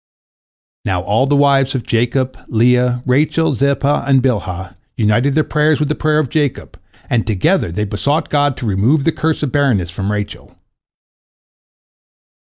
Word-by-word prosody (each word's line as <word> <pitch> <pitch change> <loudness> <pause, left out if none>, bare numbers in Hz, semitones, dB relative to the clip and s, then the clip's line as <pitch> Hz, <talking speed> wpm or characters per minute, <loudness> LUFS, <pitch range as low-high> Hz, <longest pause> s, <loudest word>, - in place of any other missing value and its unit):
Now 95 -3 -1
all 110 +8 +1
the 145 - +2
wives 140 -1 +3
of 125 - -2
Jacob, 125 +3 0
Leah, 125 +2 +2
Rachel, 150 +4 +1
Zilpah, 140 +2 0
and 135 -1 +4
Bilhah, 95 -8 -2 0.2
united 115 +5 +1
their 155 - +3
prayers 150 0 +1
with 150 -1 -1
the - - +1
prayer 155 0 0
of 155 -5 0
Jacob, 145 -4 -2 0.3
and 115 -2 -1
together 110 - +1
they 105 +5 -2
besought 140 +10 -1
God 145 -2 +1
to 130 - -6
remove 115 +9 +1
the 165 - +2
curse 160 -1 -2
of 140 - -1
barrenness 120 - +1
from 95 +3 -3
Rachel. 105 0 -6
130 Hz, 155 wpm, -16 LUFS, 105-145 Hz, 0.3 s, and